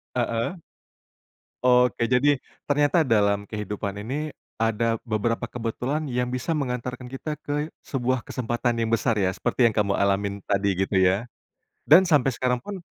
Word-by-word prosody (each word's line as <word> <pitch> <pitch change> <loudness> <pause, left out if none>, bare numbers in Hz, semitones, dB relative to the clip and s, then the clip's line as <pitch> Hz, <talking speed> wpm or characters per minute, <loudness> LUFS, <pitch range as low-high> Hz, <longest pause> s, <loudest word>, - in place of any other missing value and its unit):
Heeh. 115 +7 -1 1.1
Oke, 125 -1 +4
jadi, 130 +4 +3 0.3
ternyata 145 +3 +3
dalam 100 -6 +2
kehidupan 105 -1 -4
ini 150 +6 -3 0.3
ada 115 0 +1
beberapa 115 +1 -1
kebetulan 125 +6 -3
yang 125 -2 -1
bisa 125 +6 -2
mengantarkan 125 -3 -3
kita 135 +3 -4
ke 150 +2 -3
sebuah 130 -1 -1
kesempatan 120 -1 -2
yang 115 -1 0
besar 115 -1 +1
ya, 95 -2 +1
seperti 120 +5 +1
yang 115 - +3
kamu 100 -2 +1
alamin 100 0 +1
tadi, 100 -2 +1
gitu 95 +1 0
ya. 95 +5 +3 0.6
Dan 175 +6 +8
sampai 145 -6 +3
sekarang 125 0 0
pun, 200 +8 -6
120 Hz, 145 wpm, -25 LUFS, 105-135 Hz, 1.1 s, Dan